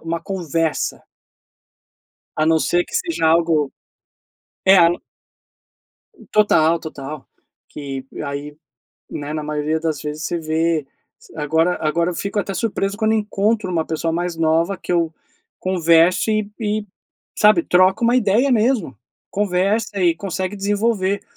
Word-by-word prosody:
uma 165 0 -3
conversa. 165 -4 -2 1.4
A 155 - +2
não 160 0 +3
ser 175 +2 +1
que - - -16
seja 335 - -1
algo, 160 -3 +3 1.0
eh 190 0 +8 1.5
Total, 170 -6 +4
total, 150 -2 -8 0.4
que 135 -2 -7 0.2
aí, 145 +1 -5 0.6
né, 145 0 -5
na 155 -1 -3
maioria 150 +1 -1
das 160 -2 -2
vezes 150 +1 -5
você 170 - -2
vê, 160 -1 0 0.3
s - - -19
agora 160 +4 +1
agora 170 +3 +1
eu - - -5
fico 200 +3 -3
até 200 -1 -2
surpreso 200 -2 -2
quando 220 0 +2
encontro 210 -1 0
uma 165 -2 0
pessoa 165 0 -2
mais 175 0 -2
nova 165 +4 +1
que 180 - -5
eu 165 -2 +1 0.5
converso 175 +2 +3
e 215 -1 0
e, 210 -1 -1 0.5
sabe, 215 +10 +5
troca 185 - +3
uma 240 +2 +4
ideia 240 +4 +3
mesmo, 220 - +1 0.3
conversa 200 +1 0
e 175 -2 +3
consegue 190 +1 -4
desenvolver, 200 -1 0
175 Hz, 130 wpm, -20 LUFS, 160-205 Hz, 1.5 s, eh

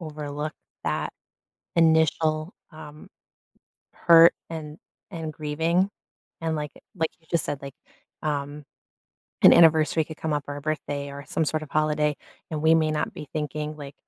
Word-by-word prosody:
overlook 150 -1 -5 0.3
that - - -1 0.6
initial, 160 0 +3 0.2
um, 150 -1 -11 0.9
hurt 170 0 +7 0.2
and 155 -2 -6 0.3
and 160 -3 -5
grieving, 160 +5 0 0.5
and 160 -1 -1
like 150 -1 -4 0.2
like 160 -4 -1
you 160 - -29
just 170 - +1
said, 145 -2 -3
like, 140 -1 -8 0.5
um, 145 0 -3 0.8
an - - +10
anniversary 160 -1 +5
could 160 0 -9
come 160 - -3
up 145 -1 -1
or 145 - -4
a - - -6
birthday 145 -2 -3
or 140 +1 -8
some 160 - 0
sort 155 0 -1
of 150 - -9
holiday, 150 -1 +1 0.3
and 155 -1 -3
we 160 +1 +5
may 155 -1 +3
not 150 0 -1
be 150 - -9
thinking, 150 0 -3
like, 140 -2 -9
155 Hz, 155 wpm, -25 LUFS, 150-160 Hz, 0.9 s, an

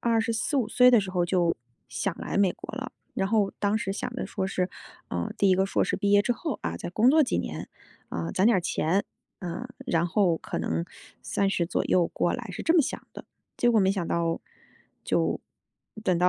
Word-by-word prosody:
24-25 230 +3 +1
岁 250 +2 +6
的 240 -3 +6
时 195 -2 -4
候 180 -2 +2
就 175 -1 +1 0.3
想 195 - -2
来 - - -4
美 195 -3 +4
国 - - -9
了。 - - -4 0.2
然 195 - 0
后 205 -1 +2
当 205 +1 +1
时 195 -2 -2
想 - - -4
的 - - -3
说 190 - -2
是， 185 -1 -1 0.4
啊， 85 -1 -2
第 200 - +3
1 - - +6
个 190 +1 +2
硕 - - +1
士 - - -1
毕 200 - 0
业 205 0 +6
之 245 - +1
后， 305 +4 -4
啊， 85 0 -2
再 - - -5
工 220 +7 +4
作 310 +2 +6
几 260 - 0
年， 90 - -4 0.4
啊， 85 0 -3
攒 190 - +3
点 230 - +5
儿 - - +2
钱， 180 +2 0 0.4
啊， 190 +7 -5 0.2
然 170 -4 +2
后 175 -2 +2
可 - - -4
能 80 +1 -1 0.4
30 195 -3 0
左 175 - -1
右 175 -2 +3
过 175 - 0
来， 245 -2 -5
是 - - -5
这 325 - +3
么 345 - +7
想 - - -3
的， - - -9 0.3
结 240 - +3
果 220 - +5
没 190 0 +4
想 190 -3 -1
到， 165 0 0 0.6
就 - - 0 0.6
等 185 -4 +3
到 180 +1 +4
195 Hz, 220 characters per minute, -27 LUFS, 175-225 Hz, 0.6 s, 么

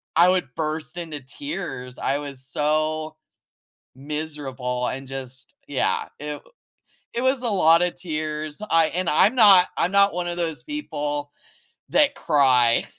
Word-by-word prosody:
I 170 +2 +6
would 180 -9 0
burst 155 0 -4
into 160 -4 -6
tears, 140 - -7
I 140 - 0
was 140 -3 -7
so 155 +2 0 0.8
miserable 135 -4 -3
and 135 +1 -5
just 130 -1 -6
yeah, - - 0
it 150 0 -5 0.7
It 235 - -2
was 260 0 +1
a 245 - -2
lotta 175 -3 +4
tears, 155 -2 -4
I 165 -1 +4
and 185 -1 0
I'm 200 +9 +4
not 200 -6 +7
I'm 180 - +1
not 200 0 +4
one 175 0 -2
of 175 0 -1
those 165 -3 0
people 145 - -4 0.6
that 290 -1 +3
cry, 130 - +3
155 Hz, 140 wpm, -23 LUFS, 140-180 Hz, 0.8 s, not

